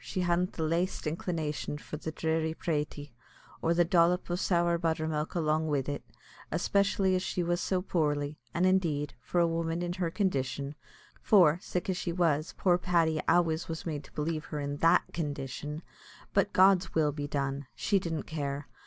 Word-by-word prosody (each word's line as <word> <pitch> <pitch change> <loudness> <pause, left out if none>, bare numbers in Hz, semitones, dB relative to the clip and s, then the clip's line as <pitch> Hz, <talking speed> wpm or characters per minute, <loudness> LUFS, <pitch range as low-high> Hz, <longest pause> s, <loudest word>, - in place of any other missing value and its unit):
she 185 - -3
hadn't 180 +1 +1
the 160 - -3
laist 170 +4 0
inclination 155 -2 -2
for 150 - -8
the 160 +1 -5
dhry 160 0 -1
pratie, 150 -2 -3 0.5
or 165 - +1
the 170 0 +4
dhrop 175 +1 +3
o' - - +1
sour 175 -1 +2
buttermilk 160 -2 -1
along 160 -1 +1
wid 145 -3 0
it, 145 0 -3 0.5
especially 200 -1 +2
as 185 - +1
she 180 -1 -1
was 175 +1 0
so 185 -1 0
poorly; 150 -4 -1
and, 175 +2 +1
indeed, 160 -7 +1
for 175 +9 -1
a 170 - +5
woman 165 +1 -1
in 175 0 -2
her 180 -2 -1
condition 140 -7 -1 0.5
for, 175 -6 +5
sick 180 - -3
as 185 -2 0
she 175 - -2
was, 165 -3 +1
poor 180 -2 +3
Paddy 165 -4 +2
always 165 -2 +2
was 165 -1 -5
made 150 -3 -3
to - - -16
believe 155 +1 -2
her 150 - -5
in 145 0 -3
that 165 +3 +5
condition 150 0 -4 0.5
but - - +2
God's 190 0 +4
will 155 -2 +3
be 145 0 -4
done! 140 -1 -2
she 200 -2 +2
didn't 165 -4 -3
care. 145 -2 -4
165 Hz, 180 wpm, -30 LUFS, 150-175 Hz, 0.5 s, a